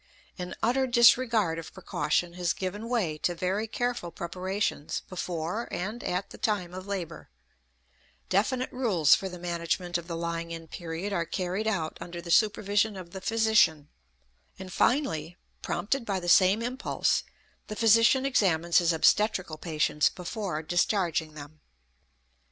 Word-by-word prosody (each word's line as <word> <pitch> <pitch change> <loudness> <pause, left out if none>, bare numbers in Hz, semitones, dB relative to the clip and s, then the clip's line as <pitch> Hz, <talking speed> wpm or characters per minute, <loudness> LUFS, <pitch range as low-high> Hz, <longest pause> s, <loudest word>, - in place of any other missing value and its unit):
An 180 0 -5
utter 260 +3 +2
disregard 235 -7 +4
of 165 - -10
precaution 170 +3 -1
has 175 -1 -1
given 205 +5 -5
way 185 -11 -1
to 175 - -1
very 190 +5 -1
careful 245 -5 -2
preparations 180 -1 -3
before 180 +4 -4
and 215 +6 -4
at 180 +2 -2
the - - -11
time 195 -5 -1
of 185 +1 -8
labor; 180 -5 -5 1.0
definite 245 +7 0
rules 200 - +3
for 190 - +1
the 180 - -8
management 175 0 -2
of 170 - -11
the 170 -2 -4
lying 170 0 -3
in 165 -1 -7
period 170 +5 -5
are 170 -3 0
carried 185 +3 -2
out 170 -8 -2
under 175 0 -7
the 170 0 -6
supervision 205 0 +2
of 175 -2 -9
the 190 - -7
physician; 220 -10 +3 0.7
and 185 -1 -9
finally, 180 - 0 0.2
prompted 265 +5 -1
by 195 -4 -2
the 175 - -7
same 190 +5 +5
impulse, 255 +4 0 0.5
the 215 - -5
physician 230 +4 +4
examines 175 -10 +3
his 170 -1 +2
obstetrical 180 -1 +2
patients 155 -2 +1
before 180 -3 -4
discharging 170 -2 0
them. 150 +1 -11
185 Hz, 145 wpm, -28 LUFS, 170-215 Hz, 1.0 s, same